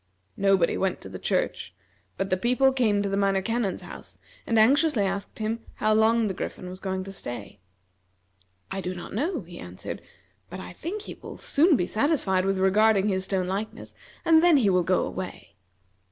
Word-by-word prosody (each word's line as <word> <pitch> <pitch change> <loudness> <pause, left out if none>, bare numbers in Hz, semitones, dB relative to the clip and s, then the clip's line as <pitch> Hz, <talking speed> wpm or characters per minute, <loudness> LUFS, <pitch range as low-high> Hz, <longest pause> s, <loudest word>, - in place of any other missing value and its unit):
Nobody 195 -3 +3
went 190 -2 0
to 95 - -9
the 95 -1 -8
church, 90 - -1 0.4
but 195 -1 -2
the - - +4
people 250 +7 +3
came 215 -6 +2
to - - -1
the 195 - -1
Minor 195 -1 +1
Canon's 225 -2 -1
house, - - -10 0.3
and 230 - +2
anxiously 270 +1 +4
asked 195 +1 -3
him 220 +1 -2 0.2
how 215 0 +2
long 225 +1 +4
the 200 - -1
Griffin 180 0 -6
was 185 +1 -8
going 190 -1 -3
to 195 - -8
stay. 120 - -7 1.1
"I 195 - -3
do 185 0 -4
not 175 - -8
know," 300 - -1
he 175 -1 -11
answered, 90 +1 -6 0.5
"but 185 - -7
I 185 - -8
think 380 - -5
he - - -7
will - - -9
soon 315 +3 +3
be 180 - +1
satisfied 215 - +1
with 195 0 +1
regarding 205 +2 +4
his 190 -1 0
stone 190 -2 -1
likeness, 195 +4 -4 0.3
and 320 -1 +6
then 345 -4 +6
he 215 -7 +3
will 180 -1 +3
go 185 +1 +1
away." 180 - -7
195 Hz, 190 wpm, -26 LUFS, 185-230 Hz, 1.1 s, and